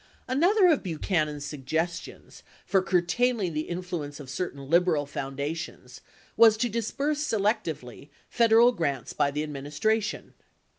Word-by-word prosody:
72 - - -7
Another 365 0 +5
of 295 - -1
Buchanan's 155 -4 -2
suggestions 160 +4 -4 0.2
for 190 -1 +2
curtailing 185 +2 +1
the 155 0 -3
influence 175 -5 -5
of 135 -3 -9
certain 140 -4 -5
liberal 170 -2 +3
foundations 140 -2 -6 0.3
was 225 -1 +6
to 240 +2 0
disburse 275 +7 -2
selectively 200 - -2 0.2
Federal 235 +1 +5
grants 140 - -3
by 140 - +1
the 150 +2 -2
administration. 150 +10 -2
170 Hz, 120 wpm, -27 LUFS, 145-220 Hz, 0.3 s, was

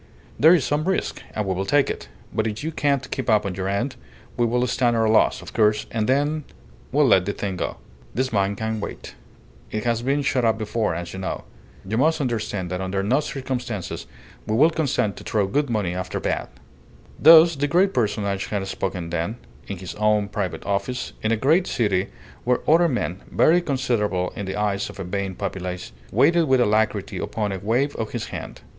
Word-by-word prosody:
There 160 +4 +8
is 155 - +1
some 150 +1 0
risk, 190 0 -1
and 105 - -1
we 95 - 0
will 95 +1 -2
take 145 +7 +3
it; - - -5 0.2
but 110 0 0
if 110 +4 -4
you 160 - -2
can't 140 -3 0
keep 130 -4 -2
up 105 -1 +4
your 95 0 -3
end, 100 +7 -1 0.4
we 120 -1 +2
will 125 +2 +1
stand 120 -1 +1
our 110 -1 +2
loss, 110 0 +3
of - - -10
course, 105 -1 +3
and 110 0 -1
then 145 +3 +1 0.5
we'll 145 +2 +4
let 95 -7 +4
the 100 - 0
thing 100 -2 -3
go. - - -3 0.3
This 130 0 -1
mine 100 0 +1
can 110 +1 -2
wait; 105 - -7 0.6
it 110 - -3
has 115 -2 0
been 140 +3 0
shut 130 -2 +1
up 110 -1 +3
before, 110 -3 -1
as 85 0 -5
you 95 - -6
know. 95 - -4 0.4
You 110 +4 0
must 160 +3 +3
understand 110 -8 -2
that 90 0 -2
under 95 +1 -1
no 125 +8 +3
circumstances 125 - -4 0.4
will 110 - +1
we 155 +6 +6
consent 135 - 0
to - - -9
throw 105 -3 +1
good 140 +8 0
money 105 -6 0
after 90 0 -3
bad." - - -2 0.7
Thus 165 +1 +8
the 145 +1 0
great 185 +6 +3
personage 100 -4 0
had 100 -2 -2
spoken 90 -3 -3
then, 85 +7 -2 0.3
in 100 - -5
his 90 0 -7
own 105 -1 +1
private 100 -3 -3
office, 120 +5 -2
in 110 - 0
a 115 - +2
great 160 - +3
city 100 -5 +1 0.4
where 125 0 0
other 170 +3 +5
men 100 - -2
(very 175 +3 +4
considerable 120 - 0
in 100 - -5
the 95 - -3
eyes 100 -1 -1
of - - -11
a - - -3
vain 95 +1 -3
populace) 90 -2 -4 0.2
waited 160 - +4
with 130 -3 +3
alacrity 110 -3 +1
upon 105 -2 -2
a 95 - -3
wave 120 +9 0
of 110 - -4
his 120 - -4
hand. - - -7
110 Hz, 200 wpm, -23 LUFS, 100-135 Hz, 0.7 s, There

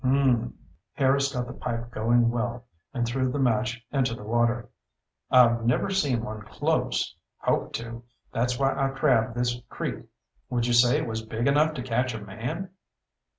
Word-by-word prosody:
"Mmmmm." 130 -3 +2 0.4
Harris 140 0 +2
got 125 -2 -2
the 125 - -8
pipe 115 0 -4
going 115 +1 +3
well 120 0 -3 0.3
and 120 -2 -1
threw 130 +2 0
the 145 - -2
match 120 -2 0
into 130 -4 +1
the 110 - -10
water. 120 +2 +1 0.6
"I've 120 -2 +5
never 120 +11 +1
seen 140 -12 +1
one 110 -1 -6
close. 105 - -1 0.2
Hoped - - -1
to. 115 0 -6 0.3
That's 120 +1 0
why 135 +1 +2
I 135 - +1
crab 130 -5 +2
this 120 0 -1
creek. - - -4 0.4
Would 120 -1 0
you 120 - +1
say 120 +1 +5
it - - -1
was 110 0 -3
big 110 +1 -3
enough 150 +3 +3
to 125 - -4
catch 125 0 0
a - - -4
man?" 120 - -5
120 Hz, 170 wpm, -26 LUFS, 115-130 Hz, 0.6 s, I've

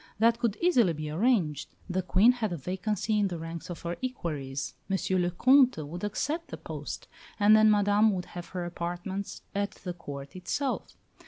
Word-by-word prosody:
That 230 +2 +4
could 230 -4 0
easily 245 - +4
be 155 -1 -5
arranged; 170 - +1
the 185 0 0
Queen 190 +6 +5
had 230 -5 -2
a 175 - -2
vacancy 210 - -1
in 205 - +3
the 175 -2 -4
ranks 165 +1 -7
of 175 - -7
her 170 0 -3
equerries. 150 - -3 0.2
M. 195 - +2 0.2
le 175 - +1
Comte 255 +7 +5
would 175 +5 -7
accept 295 +11 -2
the - - -7
post, - - -6 0.3
and 210 +1 +7
then 215 0 +6
Madame 205 +1 +4
would 180 -1 -3
have 175 -1 -8
her 180 -2 -4
apartments 175 +3 -4
at 200 0 -1
the 180 - -3
Court 140 -4 -8
itself. 260 +9 -3
190 Hz, 180 wpm, -29 LUFS, 170-220 Hz, 0.3 s, and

